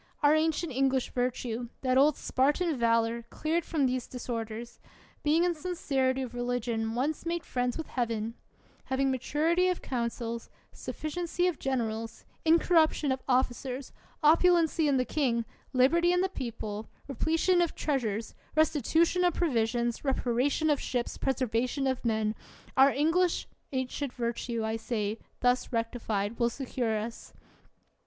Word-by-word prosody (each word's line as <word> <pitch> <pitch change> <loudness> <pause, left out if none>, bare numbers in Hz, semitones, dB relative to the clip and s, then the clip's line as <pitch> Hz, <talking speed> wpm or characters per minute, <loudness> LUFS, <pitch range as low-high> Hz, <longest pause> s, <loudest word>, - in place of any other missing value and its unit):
Our 290 +1 +6
ancient 315 +1 +1
English 265 0 +1
virtue, 245 -1 -2
that 255 -1 +1
old 280 +2 +5
Spartan 295 +5 +1
valor, 230 -1 +2
cleared 330 +2 -1
from 305 -3 0
these 255 -1 -1
disor 240 -2 -4
ders; 230 +2 -8 0.4
being 310 +3 +3
in 355 -1 +2
sincerity 275 -6 -1
of 245 - -7
religion 240 -2 -2
once 285 +5 -1
made 340 0 -2
friends 245 -1 -1
with 320 - -4
Heaven; 230 -3 -2 0.5
having 270 0 +1
maturity 320 +7 +1
of 365 -1 -1
coun 235 -3 -1
cils, 230 -1 -6 0.2
sufficiency 345 +3 -3
of 355 -5 0
generals, 230 -4 -3 0.2
incorruption 320 -3 +4
of 260 0 -1
offi 255 -1 +3
cers, 255 +1 -6 0.3
opulency 330 0 +4
in 275 - +3
the 255 - +1
king, 240 -6 0 0.3
liberty 325 +7 +4
in 360 0 +3
the 380 - +1
people, 220 - -5 0.2
repletion 325 +7 +2
in 345 - +4
treasures, 230 -9 -2 0.2
restitution 320 +3 +3
of 355 -2 +2
provisions, 235 -6 0
reparation 270 +3 +1
of 290 - +2
ships, 245 -2 -2
preservation 255 +1 0
of 260 -1 -1
men 220 -2 +1 0.2
— - - -23
our 270 +1 +7
ancient 330 +6 +2 0.3
English 260 -2 -2 0.2
virtue, 235 -1 -2
I 220 +1 -1
say 220 -2 -2 0.2
thus 250 0 +2
rectified, 230 -2 -2
will 235 -1 +3
secure 240 -3 -2
us. 225 +2 -6
260 Hz, 145 wpm, -29 LUFS, 235-310 Hz, 0.5 s, our